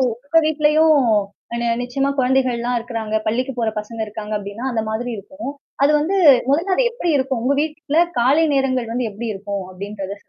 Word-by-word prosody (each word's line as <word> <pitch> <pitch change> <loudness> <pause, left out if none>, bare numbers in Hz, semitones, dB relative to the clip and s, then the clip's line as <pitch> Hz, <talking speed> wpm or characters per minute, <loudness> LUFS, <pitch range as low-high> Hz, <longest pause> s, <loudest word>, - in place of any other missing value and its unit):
உங்க 260 +6 +1
வீட்டிலேயும் 310 0 +4 0.6
நி 235 - -1 0.2
நிச்சியமா 270 +3 -1
குழந்தைகள்லாம் 250 -2 +1
இருக்குறாங்க, 225 -2 -3
பள்ளிக்குப் 250 +3 -1
போற 230 - +1
பசங்க 225 +2 -9
இருக்காங்க 210 0 -7
அப்டின்னா, 205 +5 -7
அந்த 225 - 0
மாதிரி 240 +3 -3
இருக்கும். 275 +8 -7 0.3
அது 290 - +4
வந்து 355 +7 0 0.3
முதல்ல 345 +7 +2
அது - - +3
எப்டி 465 -8 -2
இருக்கும். 260 -3 -1
உங்க 280 +2 +2
வீட்ல 310 0 -2 0.2
காலை 285 +7 +4
நேரங்கள் 260 -4 0
வந்து 245 -2 -1
எப்டி 230 +3 -5
இருக்கும்? 200 0 -5
அப்டின்றத 200 +1 -7
250 Hz, 165 wpm, -20 LUFS, 220-285 Hz, 0.6 s, வீட்டிலேயும்